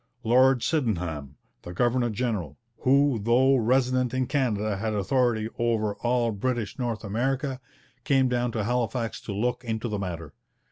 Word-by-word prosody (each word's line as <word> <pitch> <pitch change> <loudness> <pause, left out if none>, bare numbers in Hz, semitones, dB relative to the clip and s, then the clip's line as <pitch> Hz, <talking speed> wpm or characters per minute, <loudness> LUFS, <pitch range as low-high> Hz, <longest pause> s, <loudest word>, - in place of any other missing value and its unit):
Lord 125 +2 +4
Sydenham, 85 - -1 0.3
the 90 - -8
governor 120 +4 +1
general, 105 - -3 0.2
who 135 -2 +3
though 125 +5 +4
resident 130 +1 +1
in 130 0 +1
Canada 110 -7 0
had 110 +1 -2
authority 110 +2 +1
over 110 -3 +1
all 120 -1 +1
British 115 +1 -3
North 120 -3 -2
America, 130 +5 -2 0.4
came 135 -3 +3
down 125 -1 0
to 110 - -1
Halifax 120 0 -2
to - - -6
look 120 +5 -1
into 115 0 -3
the 105 -2 -3
matter. 85 -6 -5
120 Hz, 145 wpm, -26 LUFS, 105-130 Hz, 0.4 s, Lord